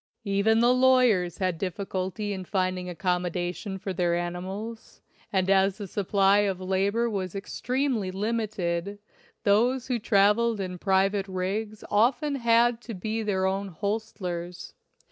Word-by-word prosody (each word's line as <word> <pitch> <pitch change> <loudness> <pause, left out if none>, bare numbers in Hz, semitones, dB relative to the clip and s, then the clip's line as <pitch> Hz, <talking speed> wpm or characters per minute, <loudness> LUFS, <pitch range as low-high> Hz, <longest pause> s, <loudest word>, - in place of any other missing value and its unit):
Even 205 +3 +3
the 240 +1 +5
lawyers 250 -9 +3
had 185 -4 -1
difficulty 190 +2 -3
in 190 -1 -5
finding 185 -1 -1
accomodations 180 +1 -2
for 190 - -2
their 175 -1 +1
animals; 190 +6 -5 0.3
and 190 -2 +1
as 195 0 +3
the 205 - -5
supply 195 +1 +2
of 195 -3 0
labor 195 +5 0
was 195 -5 -3
extremely 245 +1 -1
limited, 200 -3 -2 0.5
those 240 +5 +2
who 245 -2 0
traveled 210 +2 +3
in 180 -2 -4
private 195 +1 +2
rigs 200 +3 -3
often 245 +7 +2
had 235 -1 +3
to 235 -3 -7
be 220 +4 -3
their 195 -3 0
own 195 +1 -1
hostlers. 180 -2 -4
200 Hz, 130 wpm, -27 LUFS, 185-220 Hz, 0.5 s, the